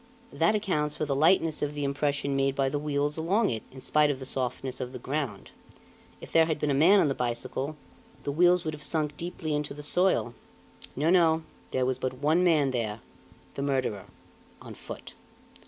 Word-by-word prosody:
That 215 Hz, -, +2 dB
accounts 155 Hz, -8 st, -1 dB
for 155 Hz, -, -2 dB
the 140 Hz, -, -1 dB
lightness 160 Hz, +1 st, +3 dB
of 145 Hz, 0 st, -2 dB
the 145 Hz, -, -3 dB
impression 140 Hz, 0 st, -1 dB
made 135 Hz, 0 st, +1 dB
by 135 Hz, -1 st, +1 dB
the 145 Hz, +2 st, -2 dB
wheels 145 Hz, 0 st, -1 dB
along 190 Hz, -, +1 dB
it, 110 Hz, -2 st, -3 dB
in 130 Hz, 0 st, -11 dB
spite 150 Hz, +2 st, +3 dB
of 145 Hz, -, -1 dB
the 130 Hz, -, -8 dB
softness 130 Hz, 0 st, -3 dB
of 125 Hz, 0 st, -5 dB
the -, -, -5 dB
ground. 130 Hz, -4 st, -4 dB, 0.7 s
If -, -, -11 dB
there 165 Hz, -1 st, +5 dB
had 160 Hz, -, 0 dB
been 150 Hz, -1 st, 0 dB
a -, -, +2 dB
man 170 Hz, +9 st, +6 dB
on 160 Hz, -, +3 dB
the 135 Hz, -, +1 dB
bicycle, 130 Hz, +4 st, -3 dB, 0.5 s
the 145 Hz, -, -2 dB
wheels 175 Hz, +3 st, +4 dB
would 155 Hz, -, -2 dB
have 150 Hz, -, -9 dB
sunk 150 Hz, -1 st, 0 dB
deeply 165 Hz, -1 st, -4 dB
into 150 Hz, -1 st, -2 dB
the 150 Hz, -, -8 dB
soil. 180 Hz, -6 st, +2 dB, 0.6 s
No, 155 Hz, +5 st, +2 dB
no; 165 Hz, -3 st, +4 dB, 0.3 s
there 130 Hz, -1 st, 0 dB
was 130 Hz, 0 st, -1 dB
but 130 Hz, 0 st, -2 dB
one 155 Hz, +7 st, +2 dB
man 155 Hz, -6 st, +3 dB
there, 115 Hz, -3 st, -2 dB, 0.5 s
the -, -, -5 dB
murderer 130 Hz, -8 st, -1 dB, 0.5 s
on -, -, -10 dB
foot." -, -, -9 dB
145 Hz, 200 wpm, -28 LUFS, 135-160 Hz, 0.7 s, man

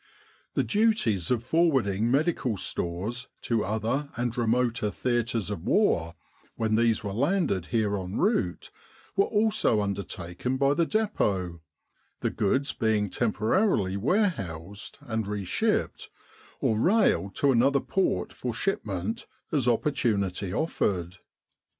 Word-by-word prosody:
The -, -, +2 dB
duties 210 Hz, -, +2 dB
of 120 Hz, -2 st, +1 dB
forwarding 130 Hz, -, +2 dB
medical 135 Hz, -, +1 dB
stores 100 Hz, +10 st, -3 dB, 0.2 s
to 115 Hz, -3 st, +1 dB
other 110 Hz, +8 st, -1 dB
and 120 Hz, -1 st, -1 dB
remoter 120 Hz, -2 st, +1 dB
theatres 115 Hz, -2 st, -1 dB
of 100 Hz, -, -4 dB
war, 85 Hz, -, +2 dB, 0.4 s
when 110 Hz, -1 st, -1 dB
these 115 Hz, -1 st, +2 dB
were 100 Hz, -2 st, -3 dB
landed 135 Hz, -, 0 dB
here 110 Hz, -4 st, +1 dB
en 95 Hz, 0 st, -4 dB
route, 185 Hz, -, 0 dB, 0.4 s
were 195 Hz, -, +4 dB
also 210 Hz, -, +2 dB
undertaken 100 Hz, +3 st, -3 dB
by 140 Hz, +1 st, +3 dB
the 165 Hz, +2 st, +1 dB
Depot, 95 Hz, -, 0 dB, 0.6 s
the -, -, 0 dB
goods 135 Hz, +7 st, +1 dB
being 105 Hz, -3 st, 0 dB
temporarily 110 Hz, -, +1 dB
warehoused, 100 Hz, -, -2 dB
and 110 Hz, -6 st, -3 dB
reshipped, 100 Hz, -3 st, -1 dB, 0.5 s
or 110 Hz, -, +1 dB
railed 175 Hz, -, +2 dB
to 140 Hz, -, +3 dB
another 135 Hz, +3 st, +4 dB
port 135 Hz, -, -1 dB
for 125 Hz, -2 st, -4 dB
shipment, 105 Hz, -, -2 dB, 0.2 s
as 140 Hz, -7 st, +1 dB
opportunity 105 Hz, -7 st, 0 dB
offered. 90 Hz, -, -1 dB
115 Hz, 120 wpm, -27 LUFS, 100-140 Hz, 0.6 s, were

